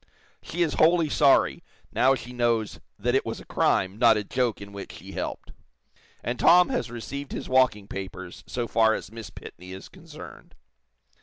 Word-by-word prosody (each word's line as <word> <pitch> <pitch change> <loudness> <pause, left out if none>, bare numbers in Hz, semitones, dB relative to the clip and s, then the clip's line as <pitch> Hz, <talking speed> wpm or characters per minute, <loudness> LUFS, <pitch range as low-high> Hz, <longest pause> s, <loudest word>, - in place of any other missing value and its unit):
She 175 +2 -1
is 160 - -1
wholly 165 -1 +4
sorry, 140 -1 +3 0.3
now 135 +1 +4
she 125 0 -9
knows 120 -3 0 0.2
that 120 +4 0
it 135 - +2
was - - -5
a - - -12
crime, 95 +3 +1
not 115 -2 +6
a 105 - -2
joke 120 +1 -1
in 100 0 -10
which 100 -1 -8
she - - -11
helped. - - -5 0.7
And 120 0 -3
'Tom' 180 +1 +6
has 255 - -2
received 135 +4 -6
his - - -5
walking 130 -6 +2
papers 95 -2 -7
so 120 -1 -3
far 110 0 +3
as - - -7
Miss 115 -1 -8
Pitney 90 +1 -11
is 95 - -10
concerned." - - -13
120 Hz, 175 wpm, -26 LUFS, 105-135 Hz, 0.7 s, not